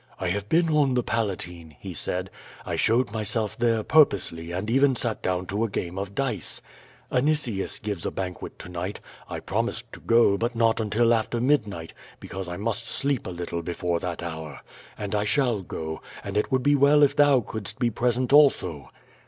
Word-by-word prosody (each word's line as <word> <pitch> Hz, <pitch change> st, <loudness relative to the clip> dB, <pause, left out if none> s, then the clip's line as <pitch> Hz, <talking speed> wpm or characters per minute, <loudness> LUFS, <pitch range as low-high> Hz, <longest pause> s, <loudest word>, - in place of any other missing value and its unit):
"I 95 Hz, -, -2 dB
have 100 Hz, +2 st, -2 dB
been 165 Hz, 0 st, +3 dB
on 145 Hz, -4 st, +3 dB
the 125 Hz, -, +2 dB
Palatine," 90 Hz, -9 st, -3 dB
he -, -, -7 dB
said. -, -, -3 dB, 0.4 s
*T -, -, -1 dB
showed 115 Hz, -1 st, +2 dB
myself 110 Hz, 0 st, -2 dB
there 115 Hz, -2 st, +1 dB
purposely 105 Hz, -, +3 dB
and 95 Hz, +4 st, -3 dB
even 135 Hz, +3 st, +4 dB
sat 115 Hz, -2 st, -1 dB
down 90 Hz, 0 st, -1 dB
to 100 Hz, +4 st, -1 dB
a 115 Hz, -, 0 dB
game 90 Hz, -2 st, -3 dB
of 100 Hz, 0 st, -5 dB
dice. 125 Hz, -, -2 dB, 0.5 s
Anicius 125 Hz, -7 st, +1 dB
gives 100 Hz, -5 st, -4 dB
a -, -, -1 dB
banquet 90 Hz, -2 st, -5 dB
to -, -, -9 dB
night; 90 Hz, +3 st, -4 dB, 0.3 s
I -, -, -4 dB
promised 115 Hz, +2 st, -2 dB
to -, -, -9 dB
go 115 Hz, -4 st, +4 dB
but 120 Hz, +1 st, -1 dB
not 115 Hz, -1 st, +3 dB
until 115 Hz, +2 st, +3 dB
after 115 Hz, +1 st, 0 dB
midnight, 105 Hz, -, 0 dB, 0.3 s
because 95 Hz, -1 st, -6 dB
I 90 Hz, -, -5 dB
must 115 Hz, +2 st, -2 dB
sleep 140 Hz, 0 st, -1 dB
a -, -, -3 dB
lit 85 Hz, -1 st, -5 dB
tle 85 Hz, -, -2 dB
before 85 Hz, 0 st, -2 dB
that 85 Hz, -1 st, -4 dB
hour. 80 Hz, -5 st, -6 dB, 0.4 s
And 105 Hz, -1 st, -4 dB
I 105 Hz, -1 st, +1 dB
shall 115 Hz, -1 st, +1 dB
go, 80 Hz, -3 st, -5 dB, 0.2 s
and 100 Hz, 0 st, -5 dB
it 105 Hz, +6 st, 0 dB
would 130 Hz, -1 st, +2 dB
be 145 Hz, -, +4 dB
well 145 Hz, +1 st, +5 dB
if 140 Hz, -, +4 dB
thou 145 Hz, -3 st, +5 dB
couldst 110 Hz, 0 st, -6 dB
be 120 Hz, -2 st, +1 dB
present 125 Hz, +3 st, 0 dB
also." 90 Hz, -, +4 dB
110 Hz, 195 wpm, -26 LUFS, 90-125 Hz, 0.5 s, well